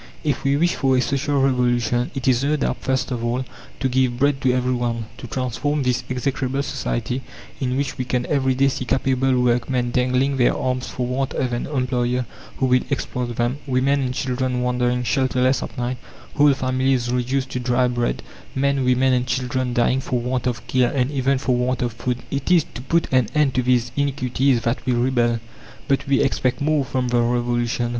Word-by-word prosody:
If 145 -2 -1
we 140 +1 +2
wish 175 +3 +2
for 135 -2 +2
a - - +4
Social 140 +2 0
Revolution, 125 -2 +1
it 135 -1 -3
is 130 0 +3
no 150 +2 +2
doubt, 145 - -1
first 130 -1 -1
of 120 -2 -3
all, 120 +2 -1 0.3
to 130 - +1
give 130 -1 +1
bread 140 +1 +1
to 130 -2 +3
everyone; 120 -2 -1
to - - -7
transform 135 +4 -1
this 125 0 0
execrable 130 +1 -1
society, 125 -1 -2 0.4
in 130 -1 -1
which 140 -2 -2
we 130 - -1
can 125 0 -1
every 130 -3 +1
day 135 +2 +3
see 130 - -2
capable 130 0 +1
workmen 125 0 +1
dangling 130 +2 +1
their 120 - +3
arms 130 0 -1
for 125 - -3
want 130 +2 -2
of 125 -2 -1
an 120 - -2
employer 125 -2 0 0.3
who 130 - +1
will 125 -1 +3
exploit 125 -3 -2
them; 120 +4 -1
women 135 +2 +2
and 130 -1 -2
children 125 -1 -1
wandering 125 0 0
shelterless 130 +1 +1
at - - -7
night; 125 +1 -2 0.4
whole 145 -1 +5
families 130 -1 0
reduced 130 +2 -1
to 125 - -2
dry 125 0 +2
bread; 120 -1 -1 0.3
men, 140 0 +1
women, 130 +1 +3
and 125 0 +1
children 130 0 -1
dying 120 +2 +2
for 125 -1 -1
want 125 +1 -2
of 120 -4 -3
care 125 -1 +2
and 130 0 0
even 135 -1 +1
for 130 -1 0
want 125 0 0
of 120 -2 -2
food. 125 +2 -2
It 140 +2 -2
is 175 -4 +5
to 120 - -7
put 165 +6 +1
an 130 -4 +4
end 150 -3 +3
to 125 - +2
these 125 -1 +1
iniquities 135 -2 +1
that 115 +2 -1
we 125 +1 0
rebel. 120 -1 +1 0.5
But 135 -1 0
we 140 -1 +3
expect 125 -1 0
more 150 0 +2
from 130 -1 -2
the 120 -1 +2
Revolution. 120 0 0
130 Hz, 195 wpm, -22 LUFS, 125-135 Hz, 0.5 s, whole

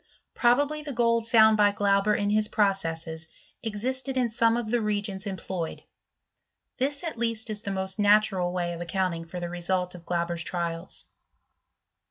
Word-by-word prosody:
Probably 285 +5 +2
the 295 -2 -6
gold 230 -1 +2
found 220 -2 +6
by 205 -1 +5
Qanb^ 200 +1 +2
in 205 0 0
his 215 0 +3
processes 165 -6 -1 0.3
existed 260 +5 -2
in 245 -3 +1
some 230 0 +3
of 225 -2 -3
the 240 -1 +2
reagents 205 -2 -2
employ 185 -3 -4
ed; - - -16 0.9
this, 280 +3 0
at 320 -9 -5
least, 230 -1 -1
is 210 -1 -1
the 200 - -5
most 190 +1 -2
natural 205 -3 +3
way 175 -1 -2
of 170 - -7
account 185 +1 -1
ing 165 0 -6
for 180 +2 -6
the 175 - -3
result 180 +1 -1
of 175 -2 -11
Glauber*s 170 0 -1
trials. 170 0 -3
205 Hz, 170 wpm, -27 LUFS, 180-230 Hz, 0.9 s, found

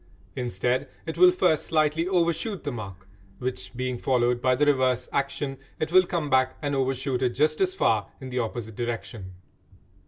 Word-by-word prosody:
Instead, 125 +1 -1 0.2
it 160 - -4
will 365 - +7
first 355 - +2
slightly 155 +1 +1
overshoot 180 +3 0
the 145 - -2
mark, 95 -6 -8 0.3
which 95 -7 -4
being 125 -1 -2
followed 125 -1 +1
by 130 0 +3
the 150 - +2
reverse 130 -3 +2
action, 140 0 -2 0.2
it 155 +1 -2
will 185 0 +6
come 170 -4 -1
back 130 -1 +2
and 145 -1 -2
overshoot 135 -1 -1
it 125 - +3
just 155 +4 +2
as 185 0 +1
far 105 - +2
in 130 - -8
the 125 - -1
opposite 110 -1 -4
direction. 115 -5 -5
130 Hz, 175 wpm, -26 LUFS, 120-155 Hz, 0.3 s, will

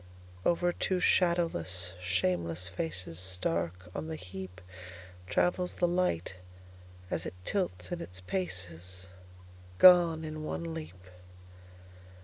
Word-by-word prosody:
Over 175 0 +3
two 185 +1 0
shadowless, 95 - +2
shameless 90 -1 0
facesStark 85 0 -1 0.2
on 155 - -4
the 160 -1 -4
heapTravels 90 - -4
the 175 - +2
light 170 - 0 0.7
as 85 -1 -1
it - - -7
tilts 90 - -1
in - - -3
its 90 +2 -7
pacesGone 90 - -3 1.2
in 155 0 -5
one 165 +1 -3
leap. 95 - -8
90 Hz, 95 wpm, -31 LUFS, -, 1.2 s, Over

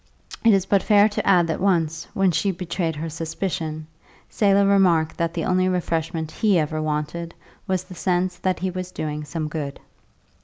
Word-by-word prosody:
It 230 - +6
is 195 -2 +3
but 195 0 +3
fair 205 -1 +5
to 210 - -3
add 180 -3 +5
that 165 - -2
once, 165 -5 +1
when 195 -1 +3
she 165 +4 0
betrayed 175 -2 -2
her 155 +2 -4
suspicion, 160 0 -4 0.5
Selah 200 -1 +3
remarked 180 -5 +3
that 170 0 -1
the 165 - -1
only 185 0 +2
refreshment 165 -3 -2
he 210 -1 +2
ever 155 0 -1
wanted 155 +2 -3 0.3
was 185 -1 0
the 185 - -12
sense 180 0 0
that 185 -1 0
he 185 0 -2
was 185 0 -5
doing 150 -4 -4
some 155 +1 -4
good. 150 -3 -5
175 Hz, 180 wpm, -23 LUFS, 160-190 Hz, 0.5 s, It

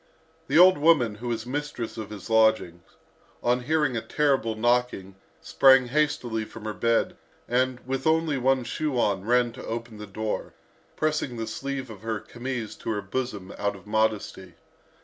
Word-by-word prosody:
The - - +2
old 185 -1 +7
woman, 145 -8 +4
who 115 +4 -8
was 115 -1 -2
mistress 135 -3 -4
of 110 -2 -6
his 105 -3 -9
lodgings, 110 -6 +3 0.6
on 120 +1 +2
hearing 150 -3 +1
a 115 - -1
terrible 135 -7 +1
knocking, 120 -4 0 0.3
sprang 130 -2 +5
hastily 125 -6 0
from 110 0 -11
her 110 - -3
bed, 115 +2 +1 0.3
and, 125 +1 +1
with 135 +2 -2
only 160 -3 +2
one 130 0 +2
shoe 145 +3 -2
on, 100 -5 +1
ran 120 +2 +2
to 125 +2 -10
open 115 -1 -6
the 105 - -8
door, 110 +2 -4 0.4
pressing 155 -5 -1
the 115 - -3
sleeve 135 +2 -5
of 105 -3 -11
her 110 -1 -3
chemise 120 0 -5
to - - -6
her 105 -2 -1
bosom 100 -3 -4
out 100 0 -1
of 95 - -14
modesty. 105 -4 -1
120 Hz, 170 wpm, -26 LUFS, 110-135 Hz, 0.6 s, old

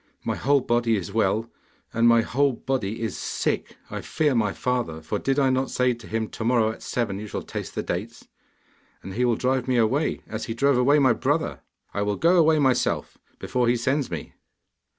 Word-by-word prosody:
My - - -1
whole 140 0 +2
body 120 -2 +1
is 100 -1 -4
well, 110 +1 +1 0.5
and 115 +1 +3
my 115 0 +6
whole 135 +4 +1
body 115 -4 -3
is 110 - -2
sick - - -2
I - - -4
fear 150 -3 0
my 110 -4 +1
father, 125 -12 -2
for 80 - -3
did 135 0 0
I 135 -2 +3
not 130 +1 0
say 125 0 +2
to 115 -1 -12
him, 110 0 -2
"To - - -6
morrow 115 -2 +3
at 110 - -11
seven 115 -5 -2
you 105 - -6
shall - - -5
taste - - -6
the - - -2
dates"? - - -5 0.8
And 95 - -7
he 125 +5 +1
will 120 -2 +2
drive 130 +1 0
me 130 -1 +2
away, 130 +7 +1
as 110 +1 -5
he 115 - -4
drove 140 0 +3
away 140 +4 +4
my 130 -4 +5
brother! 145 +7 -1 0.3
I 100 - -1
will 105 0 0
go 170 - +3
away 160 -1 +5
myself, 135 -4 +1 0.2
before 125 -1 -1
he 120 - +3
sends 130 +3 0
me. 80 -4 -6
120 Hz, 210 wpm, -25 LUFS, 110-135 Hz, 0.8 s, my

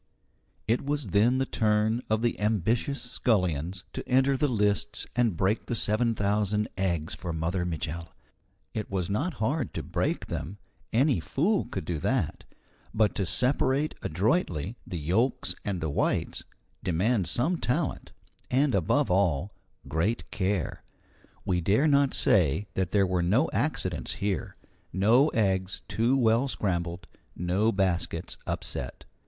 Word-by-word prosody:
It 115 +4 +1
was 140 -5 -2
then 115 +5 +4
the 135 - +1
turn 110 0 +1
of 110 +1 +1
the 120 - 0
ambitious 110 +6 +1
scullions 90 - 0
to - - -6
enter 135 +2 +4
the 145 +3 +2
lists 105 -3 0
and 115 -7 +2
break 95 +5 0
the 120 - -1
seven 115 +2 +1
thousand 105 +1 +1
eggs 85 -5 -1
for 85 -1 -5
Mother 85 +3 -1
Mitchel. 85 0 -4 0.7
It 110 -2 -4
was 95 -1 -2
not 145 - -1
hard 130 +3 -1
to - - -3
break - - -1
them 90 +8 -5 0.3
any 130 - +3
fool 175 - +1
could 95 -6 -5
do 85 -3 -2
that; 100 - -1 0.5
but 110 -1 +3
to 100 -3 -1
separate 130 - +1
adroitly 95 - 0
the 90 - -4
yolks 95 - 0
and 95 -4 -2
the 80 - -1
whites - - -1 0.4
demands 95 +4 +1
some 160 +9 +1
talent, 150 +2 -1 0.4
and, 135 +1 +2
above 100 - +2
all, 90 -1 +1 0.3
great 90 +10 -1
care. 100 -4 -1 0.6
We 90 -1 +1
dare 105 - +3
not 140 -2 +3
say 95 0 +3
that 95 -2 -1
there 100 0 +3
were 90 -1 0
no 110 - +2
accidents 90 - -1
here, 100 -1 -2 0.4
no 115 - +4
eggs 95 -7 0
too 120 +4 +2
well 115 +1 +3
scrambled, 90 -7 -2 0.3
no 95 +6 +1
baskets 95 -4 -1
upset. - - -4
105 Hz, 140 wpm, -28 LUFS, 90-125 Hz, 0.7 s, then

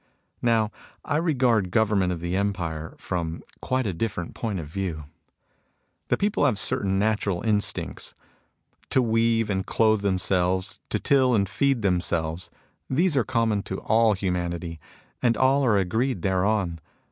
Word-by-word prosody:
Now 115 -3 +2 0.3
I 145 - 0
regard 125 - +2
government 100 -3 +2
of 85 -2 -4
the 85 +1 -2
empire 85 -6 -2
from 85 -2 -4 0.2
quite 130 0 0
a 100 - -1
diflEerent 90 -2 -3
point 105 -5 -3
of 80 - -5
view. 85 -1 -4 1.0
The - - +1
people 205 -4 +1
have 120 -7 +1
certain 95 -1 +2
natural 100 -3 0
instincts 105 -2 -1 0.4
:— - - -39
to - - +3
weave 115 -2 +2
and 95 -1 0
clothe 110 0 +2
themselves, 95 0 0
to - - 0
till 130 -4 +3
and 100 -2 +2
feed 135 +1 +1
themselves. 85 -2 -1 0.4
These 160 +4 +2
are 130 - +3
common 115 -4 0
to 95 - -3
all 110 0 +3
humanity, 85 -3 -3 0.4
and 120 -2 +2
all 135 +2 +3
are 110 -5 +3
agreed 110 +2 0
thereon. 95 -2 0
100 Hz, 145 wpm, -25 LUFS, 90-115 Hz, 1.0 s, to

